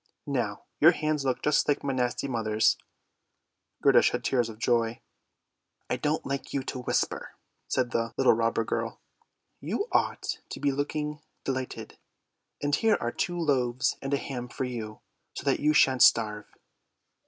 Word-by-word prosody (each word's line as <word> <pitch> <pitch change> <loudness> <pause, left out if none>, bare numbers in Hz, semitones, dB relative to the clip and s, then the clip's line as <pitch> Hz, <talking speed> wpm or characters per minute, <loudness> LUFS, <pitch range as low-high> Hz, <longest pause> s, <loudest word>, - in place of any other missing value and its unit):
Now 120 -8 -2 0.2
your 165 +4 +7
hands 155 -3 -1
look 130 -2 -1
just 150 - +3
like 145 0 +1
my 140 - -1
nasty 125 +1 -1
mother's." 110 -3 +2 1.1
Gerda - - +7
shed - - +1
tears 120 -3 +1
of 110 - -9
joy. 115 0 +1 0.5
" - - -50
I - - +1
don't 150 +4 -1
like 135 0 -4
you 135 - -1
to 130 - -5
whimper! - - -1
" - - -49
said 125 -2 0
the 115 0 -1
little 135 - +5
robber 115 0 +1
girl. - - -3 0.6
"You 415 - -2
ought - - 0
to - - -6
be 145 -1 +1
looking 150 +2 -3 0.2
delighted; 130 -1 -4 0.6
and 145 0 0
here 220 +4 +3
are 120 - -2
two 175 +6 -2
loaves 130 -6 +1
and 135 - -4
a 140 - +3
ham 125 -3 -5
for 125 - -4
you, 115 -4 -5 0.3
so - - -5
that - - +1
you 150 +1 +3
shan't 130 -4 +4
starve." 105 -3 +4
130 Hz, 165 wpm, -28 LUFS, 115-145 Hz, 1.1 s, your